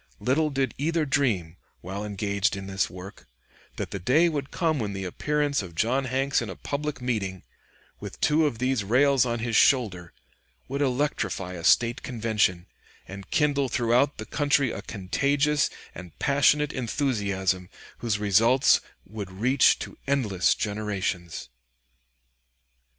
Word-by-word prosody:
Little 150 +5 +1
did 135 -2 -1
either 160 +2 0
dream, 110 - 0 0.2
while 95 +3 -5
engaged 100 0 -1
in 95 -1 -6
this 95 0 -1
work, 90 -3 -11 0.5
that - - -5
the 100 - -4
day 150 - +3
would 145 -3 -3
come 160 -4 0
when 105 -3 -3
the 95 0 -5
appearance 145 +8 -1
of 90 -4 -10
John 130 +9 +1
Hanks 135 +2 0
in 120 - -5
a 95 - -6
public 145 -2 -4
meeting, 95 -7 -2 0.6
with - - -9
two 155 +1 +3
of 120 - -4
these 130 -2 0
rails 130 +4 +3
on 120 0 -1
his 115 0 -2
shoulder, 95 -12 +3 0.6
would 140 +2 -3
electrify 125 -9 -1
a 85 -2 -7
State 120 +6 +3
convention, 110 -7 0 0.4
and 95 0 -9
kindle 140 -3 +1
throughout 120 +4 +2
the 110 - -6
country 140 -2 +1
a 100 - -5
contagious 140 +9 0 0.2
and 90 -2 -11
passionate 145 +1 +2
enthusiasm, 100 -8 -1 0.3
whose 115 -3 -1
results 110 +6 +4 0.2
would 105 -1 -7
reach 125 +8 +3
to - - -9
endless 110 -10 +2
generations. 100 - -3
120 Hz, 140 wpm, -26 LUFS, 100-140 Hz, 0.6 s, results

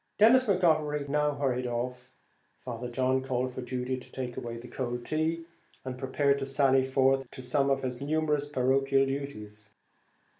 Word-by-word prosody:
Denis 245 +5 +6
McGovery 155 - +2
now 150 0 +1
hurried 130 -3 -1
off. 125 +1 -4 0.5
Father 120 -1 -5
John 130 +1 +1
called 130 -1 -2
for 130 - -5
Judy 125 +1 -3
to - - -15
take 125 -2 -5
away 115 0 -5
the 120 +1 -10
cold 120 -1 -4
tea, 160 +2 -1 0.4
and 130 -1 -4
prepared 140 +2 +1
to 135 - -2
sally 135 -1 +3
forth 135 0 +2
to 130 - -9
some 135 +2 +1
of 135 0 +1
his 125 -1 -3
numerous 150 0 0
parochial 135 0 +2
duties. 105 -7 -6
135 Hz, 160 wpm, -29 LUFS, 125-145 Hz, 0.5 s, Denis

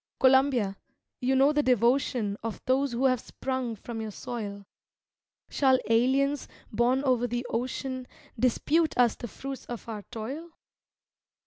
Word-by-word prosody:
Columbia, 260 -7 +4 0.4
you 260 +1 +1
know 275 +3 +5
the 295 - +3
devotion 245 -3 +2
Of 225 -1 -4
those 265 +1 +2
who 250 +3 0
have 255 -2 +3
sprung 260 -1 -3
from 225 +2 -6
your 220 - -4
soil; 205 -2 -6 0.8
Shall 265 -2 +3
aliens, 270 +5 +2 0.2
born 245 +5 +2
over 250 -3 +2
the 240 +1 -3
ocean, 255 +2 -3 0.3
Dispute 300 +6 +2
us 245 -2 +5
the 240 - -6
fruits 270 +5 -7
of 240 -1 -7
our 215 -2 -5
toil? 270 +9 -6
255 Hz, 135 wpm, -28 LUFS, 230-270 Hz, 0.8 s, know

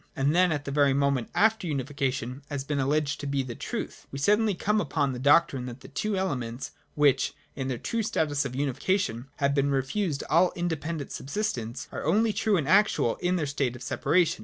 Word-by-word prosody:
And 140 0 +2
then, 180 0 +4
at 145 -2 -2
the 140 - -3
very 140 -1 +3
moment 140 -3 +1
after 220 -3 +3
unification 135 -2 -2
has 140 -3 -3
been 145 0 -2
alleged 145 +1 0
to 145 - -5
be 140 -1 0
the 125 -2 -6
truth, - - -6
we 135 - -5
suddenly 210 +7 +3
come 210 +4 +1
upon 145 -8 0
the 125 - -5
doctrine 135 -2 +3
that 125 +1 -8
the - - -11
two 200 +8 -2
elements, 130 -9 -3 0.2
which, 140 -3 +3 0.2
in 135 -1 -3
their 130 -2 -2
true 230 - -2
status 150 -9 0
of 130 -2 -5
unification, 140 - -1
had 140 0 +1
been 140 0 +2
refused 140 +4 -1
all 170 +3 +4
independent 160 -3 -3
subsistence, 135 - -3
are - - -5
only 220 +1 +2
true 210 -2 +2
and 150 -5 -1
actual 195 - +3
in 180 +1 0
their 165 -4 0
state 140 -3 -1
of 125 - -9
separation. 175 -2 +1
145 Hz, 200 wpm, -27 LUFS, 135-175 Hz, 0.2 s, then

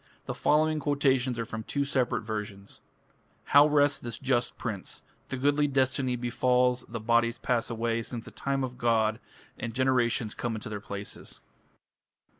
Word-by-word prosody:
The - - -3
following 155 +1 +2
quotations 135 -4 +1
are 115 - -2
from 110 -1 -5
two 140 +5 -2
separate 125 -3 +1
versions: 105 -2 -6 0.6
How 145 +1 +6
rests 145 -1 +3
this 120 -1 -6
just 125 -2 0
prince! 105 -6 -5 0.3
The 135 - -3
goodly 145 +2 +2
destiny 130 -2 +1
befalls, 125 +1 +2
The 115 0 -4
bodies 115 +1 +2
pass 120 -1 0
away 115 0 -1
Since 115 0 -6
the - - -9
time 135 -1 -1
of 130 - -2
the 125 - -17
god, 110 -2 +2 0.4
And 115 -1 -4
generations 125 -4 +1
come 120 -2 -3
into 110 - -6
their 105 -2 -5
places. 100 0 -7
120 Hz, 160 wpm, -28 LUFS, 115-135 Hz, 0.6 s, How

